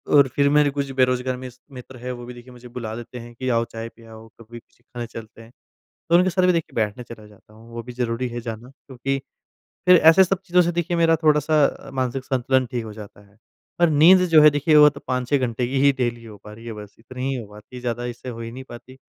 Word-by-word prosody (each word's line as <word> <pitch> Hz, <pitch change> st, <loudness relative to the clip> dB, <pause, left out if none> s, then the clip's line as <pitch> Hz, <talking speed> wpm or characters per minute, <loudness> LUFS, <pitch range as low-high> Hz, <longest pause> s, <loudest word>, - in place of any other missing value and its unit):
और 140 Hz, -2 st, +6 dB
फिर 140 Hz, 0 st, +3 dB
मेरे 150 Hz, 0 st, +4 dB
कुछ 140 Hz, -1 st, -3 dB
बेरोज़गार 130 Hz, -1 st, 0 dB
मिस 125 Hz, -1 st, -10 dB
मित्र 125 Hz, 0 st, -11 dB
है, 125 Hz, +1 st, -6 dB
वो 120 Hz, -1 st, -8 dB
भी 125 Hz, -, -9 dB
देखिए 120 Hz, +1 st, -14 dB
मुझे 125 Hz, 0 st, -13 dB
बुला 115 Hz, -3 st, -6 dB
देते 120 Hz, +1 st, -9 dB
हैं 120 Hz, 0 st, -11 dB
कि 130 Hz, +1 st, -4 dB
आओ 115 Hz, -1 st, +2 dB
चाय 115 Hz, 0 st, -7 dB
पे 115 Hz, 0 st, -20 dB
आओ, 110 Hz, 0 st, -13 dB
कभी 115 Hz, +1 st, -12 dB
कुछ -, -, -33 dB
खाने 120 Hz, -1 st, -8 dB
चलते 115 Hz, 0 st, -11 dB
हैं, 115 Hz, -, -16 dB, 0.6 s
तो 170 Hz, -, +4 dB
उनके 180 Hz, +2 st, +4 dB
साथ 185 Hz, 0 st, 0 dB
भी 180 Hz, -, +4 dB
देखिए 165 Hz, -2 st, -3 dB
बैठने 110 Hz, +2 st, -2 dB
चला 115 Hz, -2 st, -12 dB
जाता 105 Hz, +1 st, -21 dB
हूँ, 115 Hz, +2 st, -17 dB
वो 115 Hz, 0 st, -6 dB
भी 125 Hz, +1 st, -10 dB
ज़रूरी 120 Hz, 0 st, -2 dB
है 120 Hz, 0 st, -6 dB
जाना। 115 Hz, +1 st, -7 dB
क्योंकि, 135 Hz, 0 st, -5 dB, 0.7 s
फिर 180 Hz, -1 st, +8 dB
ऐसे 165 Hz, +4 st, +6 dB
सब 185 Hz, 0 st, -1 dB
चीज़ों 180 Hz, -1 st, +3 dB
से 175 Hz, -, 0 dB
देखिए 175 Hz, 0 st, -2 dB
मेरा 165 Hz, -1 st, +4 dB
थोड़ा-सा 150 Hz, 0 st, +3 dB
अ, 135 Hz, -, -5 dB
मानसिक 130 Hz, 0 st, -3 dB
संतुलन 130 Hz, 0 st, 0 dB
ठीक 120 Hz, -2 st, -3 dB
हो 105 Hz, -, -8 dB
जाता 105 Hz, -1 st, -12 dB
है, 100 Hz, -, -28 dB, 0.4 s
और 170 Hz, -, +5 dB
नींद 170 Hz, +5 st, +6 dB
जो 155 Hz, -2 st, +7 dB
है 150 Hz, -, +9 dB
देखिए 150 Hz, +2 st, +1 dB
वो 150 Hz, 0 st, +8 dB
तो 140 Hz, -1 st, -12 dB
5-6 125 Hz, +2 st, 0 dB
घंटे 120 Hz, -1 st, -2 dB
की 135 Hz, +1 st, -1 dB
ही 140 Hz, 0 st, +5 dB
डेली 120 Hz, -1 st, -2 dB
हो 105 Hz, -2 st, -12 dB
पा 105 Hz, -, -10 dB
रही 115 Hz, +2 st, -14 dB
है 115 Hz, -, -6 dB
बस 105 Hz, -1 st, -11 dB
इतनी 130 Hz, +3 st, -6 dB
ही 135 Hz, -, -2 dB
हो 105 Hz, -, -11 dB
पाती 105 Hz, +4 st, -14 dB
है, 125 Hz, -, -8 dB
ज़्यादा 120 Hz, 0 st, -3 dB
इससे 120 Hz, +1 st, -7 dB
हो 115 Hz, -1 st, -8 dB
ही 115 Hz, -, -7 dB
नहीं 130 Hz, +2 st, -9 dB
पाती। 125 Hz, +2 st, -12 dB
125 Hz, 260 wpm, -22 LUFS, 115-140 Hz, 0.7 s, है